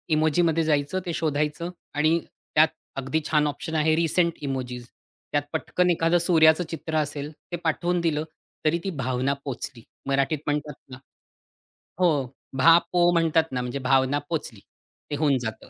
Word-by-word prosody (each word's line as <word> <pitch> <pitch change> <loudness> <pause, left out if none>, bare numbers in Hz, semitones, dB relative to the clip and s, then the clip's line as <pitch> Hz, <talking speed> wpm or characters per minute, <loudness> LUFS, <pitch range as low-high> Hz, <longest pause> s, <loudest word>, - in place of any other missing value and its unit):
इमोजीमध्ये 160 +1 +2
जायचं, 150 +3 +1
ते 170 - -3
शोधायचं, 150 +2 -1 0.2
आणि 155 +3 +2 0.4
त्यात 155 +1 +7 0.3
अगदी 135 +4 -1
छान 150 -1 +3
ऑप्शन 155 +3 -4
आहे 155 0 +3
रिसेंट 170 +1 +2
इमोजीज. 125 -3 -4 0.5
त्यात 145 -1 +1
पटकन 180 +3 0
एखादं 165 0 +3
सूर्याचं 165 -1 +5
चित्र 160 0 -5
असेल 150 0 -2 0.2
ते 175 - -1
पाठवून 175 +2 0
दिलं 155 -2 0 0.4
तरी 155 +2 +3
ती 195 - -2
भावना 130 +2 0
पोहचली. 125 -2 -6 0.2
मराठीत 140 +2 +1
म्हणतात 150 0 -2 0.2
ना 125 - -8 1.0
हो, 180 -2 +4 0.5
भा.पो 175 +4 +5
म्हणतात 165 -2 +2
ना. 125 - -1
म्हणजे 125 +2 -3
भावना 135 +1 +2
पोचली. 145 -11 -4 0.5
ते 145 - -1
होऊन 140 -3 +2
जातं. 110 -2 -6
155 Hz, 145 wpm, -25 LUFS, 140-165 Hz, 1.0 s, त्यात